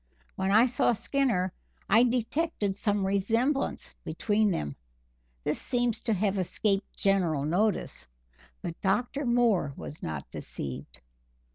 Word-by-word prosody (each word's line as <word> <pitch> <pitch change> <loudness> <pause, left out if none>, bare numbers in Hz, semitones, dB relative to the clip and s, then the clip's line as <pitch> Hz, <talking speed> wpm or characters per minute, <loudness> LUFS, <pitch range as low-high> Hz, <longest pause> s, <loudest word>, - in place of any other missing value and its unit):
When 190 0 -1
I 220 +4 +6
saw 245 -1 +2
Skinner, 230 -6 0 0.3
I 220 +3 +6
detected 245 -2 0
some 205 -1 0
resemblance 225 +9 0
between 215 0 +1
them 75 - -2 0.7
this - - -1
seems 245 -3 0
to 225 - +2
have 200 0 +1
escaped 195 +2 -1
general 175 -8 +2
notice, 175 - 0 0.6
but 165 - -5
Dr. 245 +8 0
Moore 230 - +2
was 150 - -8
not 75 -3 -4
deceived. 65 -2 -6
205 Hz, 120 wpm, -29 LUFS, 185-240 Hz, 0.7 s, I